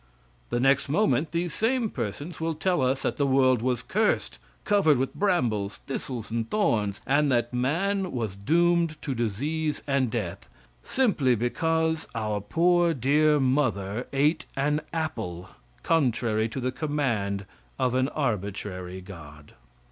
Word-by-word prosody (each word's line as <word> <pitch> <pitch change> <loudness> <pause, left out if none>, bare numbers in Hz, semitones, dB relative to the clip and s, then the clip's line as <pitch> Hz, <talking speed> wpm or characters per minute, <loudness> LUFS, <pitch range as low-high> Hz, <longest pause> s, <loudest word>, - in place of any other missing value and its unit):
The 120 - 0
next 135 +2 +3
moment, 160 -2 +2
these 170 +1 -2
same 235 +1 +1
persons 145 - -5
will 165 0 -1
tell 175 0 +1
us 130 +1 +1
that - - -1
the 140 - +2
world 130 -3 +4
was 125 -1 -1
cursed; 215 +1 0 0.3
covered 195 -9 +4
with 130 +1 -1
brambles, 120 - 0
thistles 125 -4 -5
and 115 -1 -2
thorns, 105 - 0
and 145 +1 +2
that 120 0 +1
man 185 +10 0
was 110 -6 -3
doomed 170 +8 +2
to 140 - -2
disease 145 +8 -2
and 135 -3 +1
death, 105 -7 -4 0.3
simply 165 - +2
because 160 +7 0
our 105 -2 -1
poor, 170 - +2
dear 150 +4 +3
mother 125 -5 0
ate 150 +4 +1
an 150 +2 +1
apple 95 - -4 0.3
contrary 115 -7 +1
to 130 - -5
the 130 0 -1
command 115 -11 -1 0.3
of 125 - +1
an 130 +1 +2
arbitrary 100 -8 -3
God. 75 -6 -12
135 Hz, 140 wpm, -26 LUFS, 110-160 Hz, 0.3 s, world